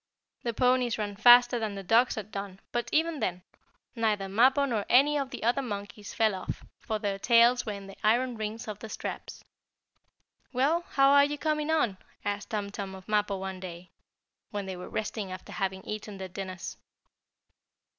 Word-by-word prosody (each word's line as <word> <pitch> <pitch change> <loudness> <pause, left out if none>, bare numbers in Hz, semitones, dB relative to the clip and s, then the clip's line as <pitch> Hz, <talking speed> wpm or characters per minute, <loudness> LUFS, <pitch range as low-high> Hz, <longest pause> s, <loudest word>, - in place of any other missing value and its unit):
The 235 - -1
ponies 250 -1 +2
ran 205 -2 -3
faster 245 +3 +7
than 215 -3 -3
the 195 - -6
dogs 230 +6 +4
had 215 -1 -6
done, 195 -1 -6
but, 240 0 -2
even 320 -1 +1
then, 180 -4 -2 0.5
neither 215 -4 0
Mappo 255 +8 +4
nor 225 -6 -1
any 280 +4 +5
of 275 -2 -1
the - - -7
other 240 +4 +2
monkeys 205 -3 -6
fell 220 -2 +2
off, 185 - -5 0.2
for 220 - -3
their 200 -2 -2
tails 235 +2 +4
were 210 - -1
in 200 -1 -8
the 195 0 -11
iron 240 +3 +2
rings 220 +1 -5
of 210 -1 -6
the 220 - -8
straps. - - -6 1.1
"Well, 280 +7 +2
how 275 0 +4
are 285 0 +7
you 295 +1 -3
coming 305 0 -1
on?" 235 -12 +1 0.3
asked 205 0 -3
Tum 205 -3 -3
Tum 195 -2 -6
of 190 -1 -13
Mappo 210 -2 +1
one 190 -1 -5
day, 180 -1 -9 0.6
when 205 -1 -4
they 190 -1 -5
were 180 - -8
resting 210 -2 -3
after 185 0 -8
having 190 -1 -2
eaten 210 -1 -6
their 190 -1 -5
dinners. 185 -1 -6
215 Hz, 185 wpm, -29 LUFS, 195-245 Hz, 1.1 s, faster